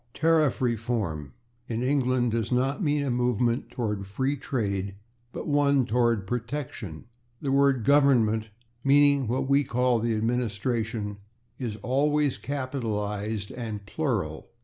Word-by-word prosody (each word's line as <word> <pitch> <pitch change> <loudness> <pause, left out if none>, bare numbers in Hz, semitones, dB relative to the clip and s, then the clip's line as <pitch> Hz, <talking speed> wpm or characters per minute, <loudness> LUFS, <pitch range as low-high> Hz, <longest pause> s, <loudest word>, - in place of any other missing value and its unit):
/Tariff 155 -4 +3
reform/, 110 - -1 0.4
in 115 +1 -2
England, 130 -3 +2
does 115 0 -1
not 130 +5 +1
mean 145 -4 +1
a 135 - -1
movement 120 0 +1
toward 105 -5 -3
free 130 +8 -1
trade, 100 -8 -2 0.4
but - - -6
one 140 -3 +3
toward 115 -3 +1
protection. 120 - -5 0.3
The 140 - -2
word 135 -4 +3
/Government/, 125 -7 +4 0.4
meaning 140 -1 +4
what 130 +3 -1
we 140 +1 +4
call 125 -2 +1
the 115 0 0
administration, 110 -1 -1 0.4
is 120 -5 -3
always 145 +2 +1
capitalized 110 -6 -3
and 110 -4 -5
plural, 105 - -2
/e. - - -41
125 Hz, 125 wpm, -27 LUFS, 110-140 Hz, 0.4 s, Government